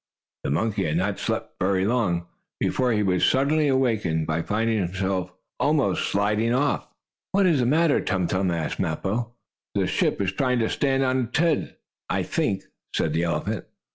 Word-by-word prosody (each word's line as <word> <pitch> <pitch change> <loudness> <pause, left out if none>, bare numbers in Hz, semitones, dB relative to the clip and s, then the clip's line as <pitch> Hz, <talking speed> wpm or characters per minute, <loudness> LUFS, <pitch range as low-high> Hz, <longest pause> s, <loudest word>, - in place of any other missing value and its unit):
The - - -2
monkey 100 +9 0
had 80 +1 0
not 95 +2 -1
slept - - -3
very 95 0 +2
long, 100 -7 +1 0.3
before 125 -1 +1
he 105 -2 +2
was 90 -2 +1
suddenly 145 +3 +3
awakened, 110 - +1
by 80 +1 -1
finding 110 +4 0
himself 95 0 -1 0.3
almost 145 -1 +1
sliding 105 +4 +1
off. 145 +2 0 0.5
"What 200 0 +4
is 165 -6 +3
the 120 - +2
matter, 155 +2 +3
Tum 95 -1 0
Tum?" 95 +2 0
asked 85 -3 -2
Mappo. 100 +7 -2 0.4
"The - - +2
ship - - 0
is 95 -2 0
trying 125 +5 +1
to 115 -2 +1
stand 135 -1 +1
on 130 -1 +1
its 120 - -3
head, 160 -2 +1 0.3
I - - 0
think," 95 -1 -1 0.3
said 75 - 0
the 80 - +1
elephant. 85 -2 -2
105 Hz, 170 wpm, -25 LUFS, 90-130 Hz, 0.5 s, What